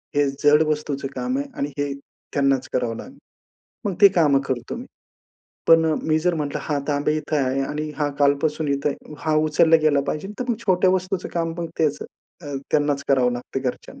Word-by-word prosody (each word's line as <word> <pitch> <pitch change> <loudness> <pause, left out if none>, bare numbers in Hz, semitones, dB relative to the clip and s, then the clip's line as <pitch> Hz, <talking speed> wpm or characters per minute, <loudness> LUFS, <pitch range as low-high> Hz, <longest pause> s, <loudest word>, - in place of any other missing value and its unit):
हे 145 -1 +3
जड 145 +3 +4
वस्तूचं 150 -2 -2
काम 255 +1 -1
आहे 280 - -3
आणि 140 - -1
हे 145 -1 -1 0.4
त्यांनाच 135 -2 +1
करावं 120 -2 0
लागेल. 265 +2 -10 0.7
मग 200 - -1
ती 200 - +10
कामं 145 -6 +4
करतो 120 -2 -3
मी. 245 +2 -8 0.8
पण 165 0 +6
अ, 160 - +2
मी 155 0 +2
जर 175 +1 +1
म्हटलं, 145 -3 -2
हा 145 -2 -1
तांब्या 145 +1 +1
इथं 155 0 -2
आहे 130 +1 0
आणि 150 +2 -3
हा 150 -1 0
कालपासून 145 +2 +1
इथे 140 +1 0
आहे. 150 +1 -7
हा 155 -1 0
उचलला 160 +1 +5
गेला 150 -2 +4
पाहिजे. 155 +7 -3
तर - - 0
मग 235 - +1
छोट्या 185 -1 +4
वस्तूंचं 185 0 -1
काम 165 -1 -1
त्यांच 160 -3 -1 0.4
अ, 145 -1 -6 0.2
त्यांनाच 145 -1 +1
करावं 130 -3 +3
लागतं 120 +2 -4
घरच्यांना. 125 -2 -5
150 Hz, 190 wpm, -23 LUFS, 140-165 Hz, 0.8 s, ती